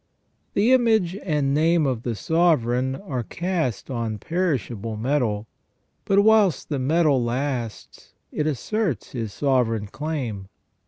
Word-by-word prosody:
The 220 +6 +4
image 220 -8 +3
and 150 -8 0
name 160 +2 +3
of 130 -4 -1
the 120 -1 -3
sovereign 130 -5 +1
are 135 -8 -4
cast 160 - -3
on 115 -3 -2
perishable 120 - -2
metal, 115 -4 0 0.6
but 200 0 +4
whilst 215 -6 +3
the 145 -3 -1
metal 145 -1 +2
lasts 120 -2 -4 0.2
it 150 - -1
asserts 165 - -2
his 115 -4 -4
sovereign 120 -5 +1
claim. 125 -6 -4
140 Hz, 120 wpm, -24 LUFS, 120-170 Hz, 0.6 s, The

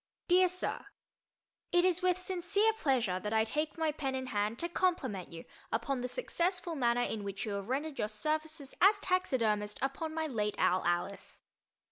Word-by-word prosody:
DEAR 365 +1 +6
SIR: 365 +1 -2 0.8
It 350 0 +4
is 365 0 +2
with 365 -1 +2
sincere 375 +4 +1
pleasure 245 - +1
that 210 +3 -3
I 220 0 +4
take 300 +8 -2
my 320 -1 +1
pen 270 -3 -3
in 260 0 -3
hand 210 -2 -1
to 340 - -1
compliment 280 - -1
you 165 -1 -9 0.3
upon 245 +3 -1
the 250 - -2
successful 355 - -1
manner 245 -4 +2
in 215 -3 -3
which 200 0 -4
you 215 - -3
have 200 +1 -4
rendered 285 +3 -2
your 210 - +1
services 305 +5 -3
as 405 +3 +6
taxidermist 230 - +1
upon 275 +4 -2
my 320 -1 0
late 210 -8 -1
owl 185 +1 +3
Alice. 175 +3 -2
275 Hz, 175 wpm, -32 LUFS, 215-345 Hz, 0.8 s, DEAR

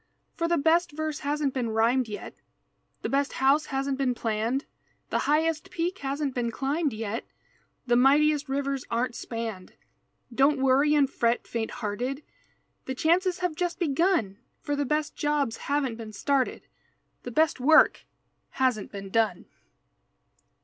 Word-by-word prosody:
For 335 - -1
the 340 0 +2
best 320 +2 +2
verse 310 0 -3
hasn't 290 -1 -1
been 245 -3 -1
rhymed 230 +3 +2
yet, 210 -1 -7 0.7
The - - -1
best 280 +1 0
house 280 +3 +3
hasn't 270 0 -2
been 255 -2 +1
planned, 230 +4 -1 0.5
The - - +1
highest 315 +1 +1
peak 350 +3 -2
hasn't 275 0 -2
been 240 -2 -1
climbed 280 +6 -1
yet, 220 0 -4 0.6
The 240 -1 +3
mightiest 290 +3 +4
rivers 275 -1 -1
aren't 240 +2 -1
spanned, 225 -6 -6 0.6
Don't 275 +4 +4
worry 270 +3 +4
and 285 -2 +4
fret, 235 -2 0
faint 225 -1 -3
hearted, 245 +6 -4 0.6
The 260 - -4
chances 360 +5 +2
have 360 -3 0
just 350 +1 -2
begun, 315 - +1 0.2
For 290 -1 -2
the 285 0 -1
Best 300 +2 -1
jobs 295 -6 0
haven't 275 -5 -1
been 220 -2 -8
started, 270 +5 0 0.6
The - - -6
Best 310 +3 +2
work 310 +5 +5 0.5
hasn't 255 -6 0
been 195 -1 -8
done. 220 -5 +1
275 Hz, 145 wpm, -27 LUFS, 235-300 Hz, 0.7 s, work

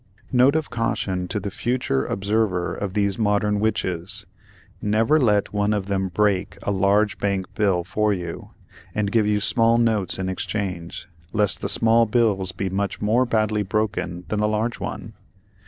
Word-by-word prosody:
[Note 130 +3 +4
of 160 -4 -1
caution 110 -6 -1
to 105 - -2
the 100 0 -5
future 120 - -1
observer 100 -4 0
of 100 -2 -5
these 100 -1 0
Modern 105 -1 +1
Witches: 100 -2 -2 0.6
Never 110 +8 +3
let 105 -7 +2
one 105 +1 +1
of 100 -2 -1
them 95 -1 -1
"break" 95 +1 0
a - - -1
large 100 +2 +2
bank 100 -2 0
bill 95 -4 +1
for 105 +4 0
you, 85 -4 -5 0.5
and 105 -1 0
give 110 -2 +2
you 105 0 +2
small 115 +2 +3
notes 110 -5 +1
in 95 0 -3
exchange, 90 -3 -4 0.3
lest 105 -2 +2
the - - -1
small 115 0 +3
bills 105 -5 +1
be 95 +2 -3
much 100 +1 -2
more 115 +5 +2
badly 110 -2 +1
broken 100 -4 -2
than 105 - -2
the 105 - +2
large 110 +2 -1
one. - - -6
105 Hz, 165 wpm, -23 LUFS, 95-110 Hz, 0.6 s, Note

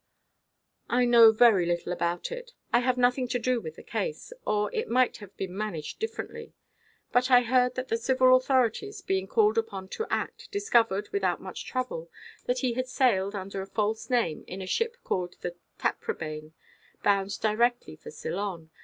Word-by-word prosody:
"I 245 +1 +3
know 235 -2 +8
very 220 -6 +5
little 175 0 -1
about 175 - -2
it. - - -7 0.2
I 240 - +6
have 250 0 +1
nothing 250 +1 +2
to 245 +1 0
do 245 0 0
with 160 -4 -7
the - - -12
case; 485 0 -4
or 210 -1 0
it - - -2
might 250 +2 +2
have 205 -2 -13
been 185 -1 -5
managed 195 - -4
differently. 455 +1 -6 0.6
But 250 +1 +3
I 250 -1 +7
heard 250 +1 +2
that 255 0 -4
the 230 - +1
civil 255 +2 +4
authorities, 260 - +1
being 190 - -1
called 220 +1 +3
upon 195 -4 -5
to 450 - -4
act, - - -3
discovered, 230 - +2
without 400 - 0
much - - -7
trouble, 250 -11 -3 0.4
that 250 +1 0
he 255 -3 +1
had 255 +2 -2
sailed, 210 -6 +2
under 195 0 -5
a 190 - -7
false 215 +3 -2
name, 235 -11 0
in 185 - -7
a 190 - -5
ship 460 - -1
called 180 -1 -2
the 175 - -4 0.2
Taprobane, 155 0 -3 0.5
bound 200 -1 +1
direct 235 +3 +2 0.2
for - - -9
Ceylon. 170 0 -5
230 Hz, 175 wpm, -28 LUFS, 190-255 Hz, 0.6 s, know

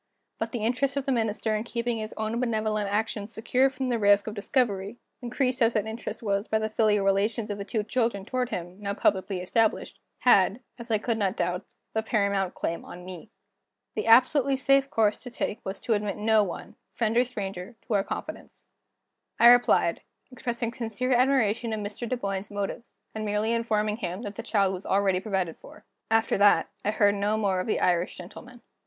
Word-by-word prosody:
But 225 0 -3
the 235 -3 -3
interest 270 +4 0
of 275 - -1
the 275 - 0
Minister 220 -2 0
in 215 - -2
keeping 235 0 -2
his 215 0 -5
own 220 +2 -2
benevolent 215 -4 0
action 210 -1 -1
secure 250 +4 +2
from 260 -1 -4
the 235 -2 0
risk 205 -1 +4
of 215 - -5
discovery 205 -1 -1 0.2
increased 255 +1 -1
as 230 0 +4
that 215 - +1
interest 220 +2 -6
was 200 0 -1
by 220 - +1
the 220 0 -2
filial 210 -2 +2
relations 210 +2 +1
of 205 - -5
the - - -3
two 215 +1 -2
children 225 -4 -1
toward 250 +1 -2
him, 180 -1 -6
now 200 0 -3
publicly 190 -2 0
established 220 +4 0 0.2
had, 200 -2 +4 0.2
as 235 +1 -9
I 220 - +3
could 225 +1 -2
not 195 0 0
doubt, 180 +2 -2 0.3
the 220 - +1
paramount 200 -4 0
claim 170 - -3
on 180 0 -10
me. 185 +2 -9 0.6
The - - -3
absolutely 265 +3 +5
safe 275 +1 +3
course 215 -4 +2
to 250 - -8
take 230 -2 -4
was 190 +1 -5
to 230 - 0
admit 205 -1 -1
no 215 0 +3
one, 205 +4 -7 0.2
friend 225 -1 0
or 245 - +5
stranger, 200 -3 -6
to 235 - -3
our 200 -1 +3
confidence. - - -7 0.7
I 235 - +9
replied, 245 0 +4 0.3
expressing 235 -1 -3
sincere 240 +1 -3
admiration 240 -3 +2
of 215 - -2
Mr. 210 +3 -5
Dunboyne's 200 -5 -3
motives, 205 +3 -5 0.2
and 220 - -4
merely 210 +2 0
informing 215 -2 0
him 185 -1 -4
that 205 - -5
the - - -6
child 195 -3 +1
was 185 +1 -6
already 195 -1 +2
provided 190 -5 -2
for. 210 - -15 0.2
After 225 -2 +2
that, 205 0 +4
I - - 0
heard 205 -1 +3
no 205 +2 0
more 195 -4 +1
of 185 - -3
the - - 0
Irish 175 0 +1
gentleman. 240 +7 -11
215 Hz, 195 wpm, -27 LUFS, 200-235 Hz, 0.7 s, I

